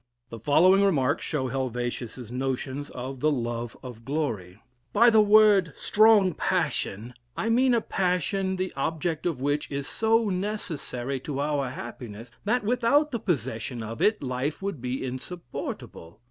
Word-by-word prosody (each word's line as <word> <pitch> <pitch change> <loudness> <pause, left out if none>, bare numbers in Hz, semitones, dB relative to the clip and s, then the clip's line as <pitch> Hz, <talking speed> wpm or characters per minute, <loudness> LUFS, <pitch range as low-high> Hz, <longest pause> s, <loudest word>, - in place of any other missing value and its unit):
The 115 - -8
following 175 - +5
remarks 145 -8 +2
show 130 -4 -1
Helvetia's 125 -2 -4
notions 135 +2 -3
of 130 +1 -6
the 155 - +3
"love 120 -3 -3
of 120 -3 -9
glory": 115 - -3 0.4
"By 235 +3 +6
the 220 -1 +6
word 205 -5 +5
Strong 210 -4 +5
Passion, 115 -4 -1 0.2
I 225 - -1
mean 250 +2 +4
a 230 - +2
passion 190 0 0
the 185 0 -3
object 160 +3 -1
of 150 -7 -2
which 145 +2 0
is 140 -1 -4
so 225 0 +2
necessary 165 - -3
to 140 +1 -5
our 145 -2 0
happiness, 120 -2 -8
that 240 +3 +1
without 250 +7 +2
the 235 - -2
possession 125 - -2
of 115 +1 -6
it 215 -6 +2
life 130 +3 -2
would 195 -9 -4
be 125 +1 -3
insupportable. 125 - -7
145 Hz, 145 wpm, -26 LUFS, 125-195 Hz, 0.4 s, By